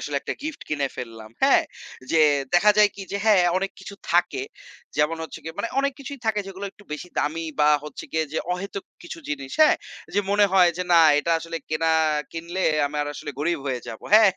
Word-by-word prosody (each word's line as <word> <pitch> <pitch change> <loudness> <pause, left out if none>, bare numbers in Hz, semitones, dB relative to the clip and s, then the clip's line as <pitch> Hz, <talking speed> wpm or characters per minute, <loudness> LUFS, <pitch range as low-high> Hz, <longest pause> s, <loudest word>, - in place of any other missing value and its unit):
আসলে 145 - -3
একটা - - -4
গিফট 310 0 -5
কিনে 145 -2 0
ফেললাম। 115 -3 -8
হ্যাঁ? - - +5 0.5
যে 165 - +4 0.4
দেখা 205 +4 +6
যায় 210 -1 +7
কি 200 - -8
যে - - 0
হ্যাঁ, 205 -5 +5
অনেক 195 +1 -2
কিছু 200 - -9 0.2
থাকে। 180 - +2 0.5
যেমন 150 +2 +2
হচ্ছে 160 - -7
গিয়ে, 160 0 -7
মানে 230 - -1
অনেক 280 0 0
কিছুই 280 0 -7
থাকে 215 -1 +1
যেগুলো 195 +1 -7
একটু 205 - -19
বেশি 150 +4 -6
দামি 160 +3 -1 0.2
বা 150 - +5 0.2
হচ্ছে 150 - -8
গিয়ে 160 0 +1
যে 160 - 0
অহেতুক 195 +2 -5 0.2
কিছু 340 -1 -8
জিনিস, 135 -2 -4
হ্যাঁ? 305 - +7 0.4
যে 205 - +4
মনে 205 0 +5
হয় 180 -2 +6
যে 180 - -1
না 170 - +8 0.2
এটা 170 - 0
আসলে 165 0 -5
কেনা 155 +1 -1 0.5
কিনলে, 170 +3 -5 0.3
আমি 150 +1 -6
আর - - -4
আসলে 145 - -6
গরিব 165 +3 0
হয়ে 130 -2 -2
যাবো। 110 - -8
হ্যাঁ, 215 -2 +8
175 Hz, 210 wpm, -24 LUFS, 150-205 Hz, 0.5 s, না